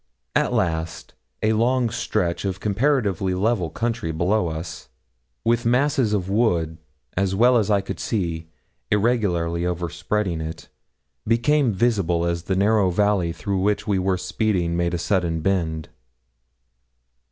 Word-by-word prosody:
At -, -, +2 dB
last, 80 Hz, -2 st, -2 dB, 0.3 s
a 110 Hz, +1 st, +3 dB
long 120 Hz, +1 st, +2 dB
stretch 90 Hz, -6 st, -1 dB
of 95 Hz, -1 st, -2 dB
comparatively 105 Hz, -, +1 dB
level 95 Hz, -3 st, +1 dB
country 115 Hz, -3 st, -2 dB
below 90 Hz, +4 st, +1 dB
us, 80 Hz, 0 st, -6 dB, 0.6 s
with 120 Hz, 0 st, +2 dB
masses 125 Hz, 0 st, +2 dB
of 100 Hz, -4 st, 0 dB
wood 85 Hz, -7 st, +1 dB, 0.4 s
as 95 Hz, 0 st, 0 dB
well 120 Hz, +5 st, +5 dB
as 110 Hz, -3 st, +2 dB
I 100 Hz, -2 st, +3 dB
could 95 Hz, -, -6 dB
see 85 Hz, -6 st, -2 dB, 0.4 s
irregularly 100 Hz, -7 st, +1 dB
overspreading 90 Hz, +1 st, -2 dB
it, 80 Hz, +1 st, -7 dB, 0.6 s
became 125 Hz, +3 st, +3 dB
visible 95 Hz, -6 st, +1 dB
as 85 Hz, 0 st, -2 dB
the 95 Hz, -, 0 dB
narrow 100 Hz, 0 st, +3 dB
valley 100 Hz, -2 st, +1 dB
through 95 Hz, +4 st, -2 dB
which 105 Hz, +2 st, 0 dB
we 100 Hz, -4 st, +1 dB
were 95 Hz, 0 st, +1 dB
speeding 90 Hz, -3 st, 0 dB
made 85 Hz, 0 st, 0 dB
a -, -, -1 dB
sudden 85 Hz, -2 st, 0 dB
bend. 80 Hz, -4 st, -1 dB
95 Hz, 135 wpm, -23 LUFS, 85-110 Hz, 0.6 s, well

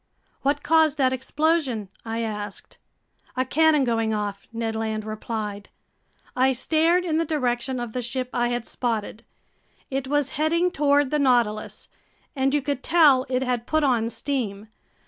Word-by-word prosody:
"What 285 Hz, +1 st, 0 dB
caused 320 Hz, -2 st, +3 dB
that 260 Hz, -2 st, +2 dB
explosion?" 265 Hz, -, 0 dB, 0.2 s
I 225 Hz, 0 st, -3 dB
asked. 210 Hz, -2 st, -6 dB, 0.6 s
"A 255 Hz, -, +1 dB
cannon 310 Hz, +2 st, +3 dB
going 225 Hz, -3 st, 0 dB
off," 205 Hz, -1 st, -4 dB
Ned 225 Hz, -1 st, -3 dB
Land 220 Hz, -1 st, -2 dB
replied. 215 Hz, -1 st, -5 dB, 0.7 s
I 260 Hz, +1 st, +3 dB
stared 325 Hz, +7 st, +2 dB
in 320 Hz, -2 st, +1 dB
the -, -, +2 dB
direction 255 Hz, -4 st, -1 dB
of 240 Hz, -2 st, -5 dB
the 250 Hz, -, -2 dB
ship 250 Hz, +2 st, -3 dB
I 240 Hz, -1 st, +1 dB
had 240 Hz, -1 st, -2 dB
spotted. 225 Hz, -3 st, -3 dB, 0.7 s
It 270 Hz, 0 st, -2 dB
was 290 Hz, -1 st, 0 dB
heading 335 Hz, +3 st, +2 dB
toward 285 Hz, -3 st, +2 dB
the 300 Hz, -, +1 dB
Nautilus, 240 Hz, -6 st, +1 dB, 0.5 s
and 270 Hz, 0 st, +1 dB
you 290 Hz, -1 st, +1 dB
could 280 Hz, -2 st, -2 dB
tell 295 Hz, -6 st, +4 dB
it 255 Hz, 0 st, 0 dB
had 245 Hz, -2 st, -2 dB
put 310 Hz, 0 st, +1 dB
on 240 Hz, -5 st, +2 dB
steam. 220 Hz, -6 st, -3 dB
255 Hz, 155 wpm, -24 LUFS, 225-290 Hz, 0.7 s, tell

